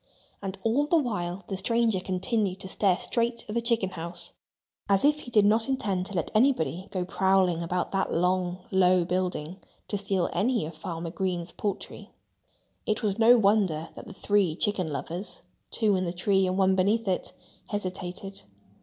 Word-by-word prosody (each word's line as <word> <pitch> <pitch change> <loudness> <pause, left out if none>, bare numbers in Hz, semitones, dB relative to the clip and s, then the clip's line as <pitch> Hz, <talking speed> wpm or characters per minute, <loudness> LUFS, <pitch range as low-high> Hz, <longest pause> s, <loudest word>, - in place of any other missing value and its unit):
And 195 -1 -5
all 260 +6 +2
the 335 - +4
while 200 - -2
the 195 - -3
stranger 225 0 +1
continued 190 +1 -1
to 190 - -5
stare 190 -1 +2
straight 235 -1 -1
at 210 - -5
the 235 - +1
chicken 230 -5 +1
house, 170 0 -4 0.6
as 195 +5 +4
if 300 +1 +4
he 250 - -9
did 210 -3 +4
not 220 +4 +3
intend 195 -8 -1
to 200 - -6
let 170 - -1
anybody 215 - +2
go 185 -2 -2
prowling 190 -2 +2
about 175 +1 -2
that 195 -1 0
long, 180 +1 0
low 185 -2 +4
building 180 -1 -2 0.3
to 205 - -1
steal 195 -3 0
any 235 -3 +1
of 160 - -7
Farmer 165 +1 -5
Green's 180 -2 -2
poultry. 205 -2 -5 0.8
It 215 +2 0
was 205 0 0
no 235 +2 +7
wonder 195 -7 +2
that - - -10
the 205 - -9
three 195 -6 +1
chicken 185 -4 -1
lovers 175 +6 -5 0.3
(two 215 -3 +2
in 185 0 0
the 170 - -2
tree 190 +1 +2
and 185 +1 -1
one 190 -1 +4
beneath 205 +4 +1
it) 185 - -1 0.3
hesitated. 195 -1 -5
190 Hz, 175 wpm, -27 LUFS, 180-215 Hz, 0.8 s, no